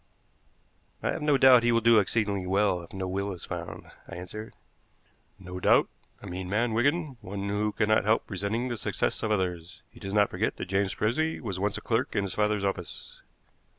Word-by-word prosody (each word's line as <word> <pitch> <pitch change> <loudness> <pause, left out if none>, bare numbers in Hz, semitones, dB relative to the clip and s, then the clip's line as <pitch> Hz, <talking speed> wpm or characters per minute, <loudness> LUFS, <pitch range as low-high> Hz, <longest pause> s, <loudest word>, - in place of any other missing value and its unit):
"I - - +1
have - - -4
no 150 -2 +3
doubt 130 -2 +7
he 120 0 +2
will 115 - +4
do 115 -1 +6
exceedingly 100 -2 0
well 95 -1 +2
if 85 - -13
no 95 -1 -4
will 100 +2 -2
is 85 - -9
found," 85 -2 -7 0.2
I - - -8
answered. 100 +5 -8 0.8
"No 90 -1 -8
doubt. - - +4 0.3
A - - -8
mean 90 -1 -5
man, 115 +3 +1
Wigan, 145 +3 +1
one 100 0 -5
who 105 +1 0
cannot 110 +1 +2
help 110 +2 +2
resenting 105 +5 -2
the 120 - -3
success - - -1
of 110 - -1
others. 90 -4 -2
He - - -16
does 95 +1 -5
not 105 -1 +4
forget - - -1
that - - -4
James 95 +1 0
Frisby 155 +9 0
was 95 -6 -4
once 100 +1 0
a - - -7
clerk 115 +2 -1
in 100 - +2
his 100 - -4
father's 105 -1 +1
office." 95 -3 -5
100 Hz, 200 wpm, -28 LUFS, 95-115 Hz, 0.8 s, doubt